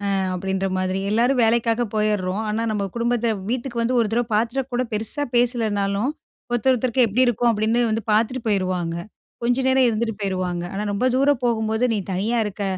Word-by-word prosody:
ஆ -, -, +1 dB, 0.2 s
அப்படின்ற 190 Hz, +1 st, -2 dB
மாதிரி. 185 Hz, +1 st, -1 dB
எல்லாரும் 245 Hz, +3 st, +3 dB
வேலைக்காக 230 Hz, +1 st, +2 dB
போயிர்றோம். 210 Hz, -2 st, 0 dB
ஆனா 220 Hz, +2 st, -1 dB
நம்ம 200 Hz, -2 st, -1 dB
குடும்பத்த 235 Hz, -1 st, +1 dB, 0.2 s
வீட்டுக்கு 240 Hz, -1 st, -2 dB
வந்து 245 Hz, +2 st, +1 dB
ஒரு 220 Hz, -, +1 dB
தடவை 240 Hz, 0 st, +1 dB
பாத்துட்டா 235 Hz, +5 st, 0 dB
கூட 250 Hz, +1 st, 0 dB
பெருசாபேசலேனாலும், 225 Hz, -2 st, 0 dB, 0.4 s
ஒருத்தர் 240 Hz, +2 st, +2 dB
ஒருத்தருக்கு 250 Hz, 0 st, +2 dB
எப்படி 250 Hz, +5 st, +2 dB
இருக்கோம் 240 Hz, 0 st, +2 dB
அப்படின்னு 220 Hz, +3 st, +1 dB
வந்து 220 Hz, -1 st, -1 dB
பார்த்துட்டு 235 Hz, +4 st, +1 dB
போயிருவாங்க. 185 Hz, -4 st, 0 dB, 0.5 s
கொஞ்ச 245 Hz, +1 st, +2 dB
நேரம் 260 Hz, -1 st, +4 dB
இருந்துட்டு 225 Hz, -1 st, -1 dB
போயிருவாங்க. 185 Hz, -3 st, -2 dB
ஆனா 205 Hz, +2 st, -3 dB
ரொம்ப 235 Hz, +6 st, 0 dB
தூரம் 275 Hz, -1 st, +2 dB
போகும்போது, 220 Hz, 0 st, 0 dB
நீ 210 Hz, -, 0 dB
தனியா 220 Hz, +6 st, 0 dB
இருக்க. 205 Hz, 0 st, -4 dB
225 Hz, 165 wpm, -22 LUFS, 205-245 Hz, 0.5 s, நேரம்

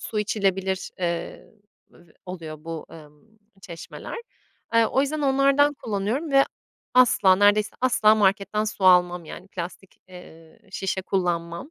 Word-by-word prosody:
su 215 Hz, -, -4 dB
içilebilir, 195 Hz, -2 st, -1 dB
eee, 170 Hz, -2 st, -4 dB, 0.4 s
b -, -, -22 dB, 0.3 s
oluyor 160 Hz, -4 st, -8 dB
bu, 165 Hz, -1 st, -7 dB
ımm, 160 Hz, +8 st, -17 dB, 0.2 s
çeşmeler. 170 Hz, -, -9 dB, 0.6 s
Eee, 230 Hz, -1 st, +5 dB
o 265 Hz, -, +1 dB
yüzden 295 Hz, +2 st, -2 dB
onlardan 275 Hz, +1 st, +3 dB
kullanıyorum 230 Hz, +8 st, -3 dB
ve 275 Hz, 0 st, +6 dB, 0.5 s
asla, 215 Hz, -7 st, +5 dB
neredeyse 205 Hz, +1 st, +3 dB
asla, 220 Hz, -4 st, +4 dB
marketten 205 Hz, +1 st, +1 dB
su 210 Hz, -3 st, -4 dB
almam. 180 Hz, -2 st, +4 dB
Yani, 185 Hz, +4 st, -11 dB
plastik, 185 Hz, +1 st, -8 dB
eee, 165 Hz, -3 st, -15 dB
şişe 190 Hz, 0 st, -3 dB
kullanmam. 175 Hz, -, -2 dB
195 Hz, 130 wpm, -24 LUFS, 175-225 Hz, 0.6 s, ve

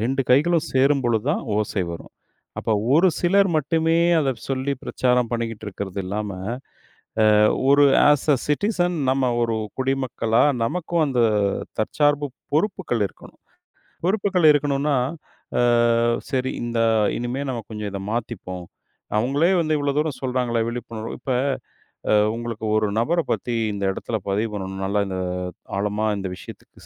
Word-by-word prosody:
2 130 Hz, +5 st, 0 dB
கைகளும் 155 Hz, +5 st, +3 dB
சேரும் 135 Hz, +1 st, +3 dB
பொழுது 115 Hz, -3 st, +1 dB
தான் -, -, -1 dB, 0.2 s
ஓசை 105 Hz, -2 st, -1 dB
வரும். 85 Hz, -, -9 dB, 0.5 s
அப்ப, -, -, -3 dB, 0.2 s
ஒரு 175 Hz, +5 st, +5 dB
சிலர் 195 Hz, +2 st, +4 dB
மட்டுமே 160 Hz, +2 st, +1 dB, 0.2 s
அத 135 Hz, -4 st, +1 dB
சொல்லி 135 Hz, +1 st, -1 dB
பிரச்சாரம் 125 Hz, -1 st, +1 dB
பண்ணிக்கிட்டு 115 Hz, -2 st, -3 dB
இருக்கறது 100 Hz, -1 st, -5 dB
இல்லாம, 105 Hz, +2 st, -3 dB, 1.1 s
அ, -, -, +5 dB, 0.3 s
ஒரு 145 Hz, +1 st, +6 dB, 0.3 s
அஸ் 145 Hz, 0 st, +1 dB
அ -, -, +1 dB
சிட்டிசன் 175 Hz, +2 st, 0 dB
நம்ம 130 Hz, -2 st, +1 dB
ஒரு 115 Hz, -1 st, 0 dB, 0.3 s
குடிமக்களா, 130 Hz, -4 st, +1 dB, 0.2 s
நமக்கும் 170 Hz, +4 st, 0 dB
அந்த 130 Hz, -3 st, 0 dB, 0.6 s
தற்சார்பு 145 Hz, +5 st, +1 dB, 0.2 s
பொறுப்புகள் 160 Hz, -, 0 dB
இருக்கணும். -, -, -17 dB, 0.7 s
பொறுப்புகள் 195 Hz, -3 st, +1 dB
இருக்கணும்னா, 145 Hz, -1 st, +1 dB, 0.6 s
அ, -, -, +4 dB, 0.7 s
செரி, 130 Hz, 0 st, 0 dB
இந்த 120 Hz, -1 st, -2 dB, 0.4 s
இனிமே 125 Hz, +3 st, -3 dB
நம்ம 120 Hz, -3 st, -4 dB
கொஞ்சம் 105 Hz, -2 st, -5 dB
இத 100 Hz, -, -5 dB
மாத்திப்போம். 95 Hz, -6 st, -4 dB, 0.5 s
அவங்களே 140 Hz, -, +2 dB
வந்து 155 Hz, -1 st, +1 dB
இவ்வளோ 145 Hz, -1 st, 0 dB
தூரம் 150 Hz, -4 st, -1 dB
சொல்றாங்களே, 125 Hz, -3 st, 0 dB
விழிப்புணர்வு. 115 Hz, -2 st, -5 dB
இப்ப, 130 Hz, +1 st, -4 dB, 0.8 s
அ -, -, +5 dB, 0.2 s
உங்களுக்கு 115 Hz, -1 st, -5 dB
ஒரு 110 Hz, -1 st, +2 dB
நபர 165 Hz, +9 st, +1 dB
பத்தி 120 Hz, -1 st, -2 dB, 0.2 s
இந்த 100 Hz, 0 st, -4 dB
இடத்துல 110 Hz, +3 st, -3 dB
பதிவு 105 Hz, +3 st, 0 dB
பண்ணணும். 95 Hz, -1 st, -5 dB
நல்லா, 100 Hz, +2 st, 0 dB
இந்த 95 Hz, -1 st, -4 dB, 0.6 s
ஆழமா 105 Hz, +2 st, -1 dB
இந்த 95 Hz, -, -4 dB
விஷயத்துக்கு -, -, -13 dB
125 Hz, 135 wpm, -23 LUFS, 110-145 Hz, 1.1 s, ஒரு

